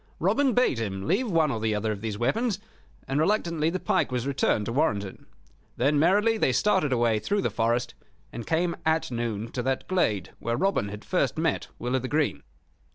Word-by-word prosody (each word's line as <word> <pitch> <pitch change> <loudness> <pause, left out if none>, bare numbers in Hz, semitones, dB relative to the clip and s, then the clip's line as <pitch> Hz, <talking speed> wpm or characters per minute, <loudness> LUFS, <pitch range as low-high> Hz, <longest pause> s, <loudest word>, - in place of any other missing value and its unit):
Robin 275 -3 +2
bade 245 - +2
him 95 -4 -3
leave 220 +8 +1
one 160 -5 +2
or 115 - -2
the 110 -1 0
other 110 +1 -1
of 100 -2 -5
these 110 -2 -3
weapons, 205 - 0 0.5
and 135 +2 0
reluctantly 165 -3 +1
the 185 +2 -2
pike - - 0
was 125 -1 -1
returned 135 -6 +1
to 115 - -3
Warrenton. 105 -10 -1 0.5
Then 145 +4 +2
merrily 205 +7 +3
they 130 - +2
started 190 -4 +2
away 115 -3 +2
through 200 - -1
the - - 0
forest, 115 +2 0 0.4
and 115 -1 -7
came 170 +1 +1
at 160 -3 +1
noon 115 -2 -3
to 125 - -2
that 130 +1 -2
glade 110 - 0
where 115 0 -2
Robin 190 - +1
had 105 +1 -9
first - - 0
met - - 0
Will 125 +2 -2
o' - - +2
th' 130 +1 -5
Green. 150 0 0
135 Hz, 200 wpm, -26 LUFS, 115-175 Hz, 0.5 s, merrily